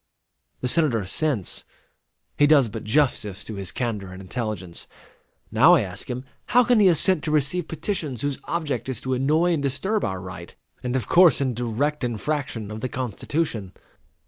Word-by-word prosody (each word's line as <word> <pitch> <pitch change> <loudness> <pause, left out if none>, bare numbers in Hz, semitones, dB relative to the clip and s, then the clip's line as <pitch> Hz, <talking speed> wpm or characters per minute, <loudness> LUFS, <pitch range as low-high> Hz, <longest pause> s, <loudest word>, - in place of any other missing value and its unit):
The 125 - 0
Senator 140 -6 +2
assents. 105 - -2 0.7
He 145 - +4
does 145 -6 +5
but 110 +1 -6
justice 105 -5 0
to 110 - -7
his 100 -3 -3
candor 105 -6 -3
and 95 - -9
intelligence. 95 -3 -5 0.6
Now 140 +11 +7
I 150 - +3
ask 95 +3 -7
him, 125 +1 -4 0.2
how 250 +3 +5
can 245 -1 +4
he 200 - +6
assent 175 -1 +4
to - - -1
receive 155 +3 +1
petitions 160 - -3
whose 145 -1 -1
object 155 -5 -2
is 130 - -3
to 130 - -2
annoy 155 +7 +2
and 155 - 0
disturb 190 +10 -1
our 95 -2 -2
right, 90 -1 -9 0.3
and 125 0 -2
of 130 - -1
course 175 -3 +6
in 130 -3 0
direct 125 +6 -1
infraction 120 -2 -3
of 110 - -5
the 130 - -2
Constitution? 120 - -3
130 Hz, 170 wpm, -24 LUFS, 110-155 Hz, 0.7 s, Now